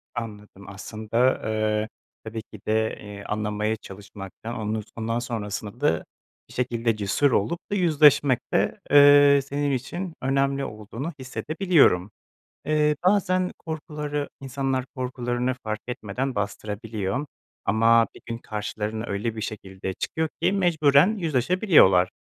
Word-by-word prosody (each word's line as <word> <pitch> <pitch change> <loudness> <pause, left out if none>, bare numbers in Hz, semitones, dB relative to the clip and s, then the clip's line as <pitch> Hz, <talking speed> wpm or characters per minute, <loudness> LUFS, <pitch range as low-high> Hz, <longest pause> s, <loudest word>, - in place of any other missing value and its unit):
Anladım. 105 -4 -7
Aslında, 110 +5 0
eee, 110 0 0 0.4
tabii 110 0 -5
ki 110 - -13
de, 110 0 +1
iii, 100 -1 -9
anlamaya 105 +1 -1
çalışmaktan 100 +2 -9
onun 110 0 -2
ondan 115 +1 -1
sonrasında 110 -2 -5
da 80 - +1 0.4
bir - - -13
şekilde 120 -2 0
cesur 105 +7 +1
olup 120 - +1
da - - +1
yüzleşmek 150 - +5
de, - - +1
eee, 145 0 +8
senin 145 +1 -1
için 170 +8 -3
önemli 135 +1 +1
olduğunu 110 +9 -6
hissedebiliyorum. 135 - +2 0.5
Eee, 150 0 +2
bazen 185 -2 +2
korkuları 150 -2 -4
insanlar 135 -1 -2
korkularını 125 -1 -2
fark 110 0 -3
etmeden 125 +3 -3
bastırabiliyor. 105 +3 -3 0.4
Ama 115 +2 +4
bir - - -13
gün 115 0 -4
karşılarına 110 0 -4
öyle 105 +3 -2
bir 110 - -5
şekilde 95 -3 -5
çıkıyor 160 +9 -2
ki - - +3
mecburen 170 -1 +4
yüzleşabiliyorlar. 155 - +4
120 Hz, 120 wpm, -25 LUFS, 105-145 Hz, 0.5 s, eee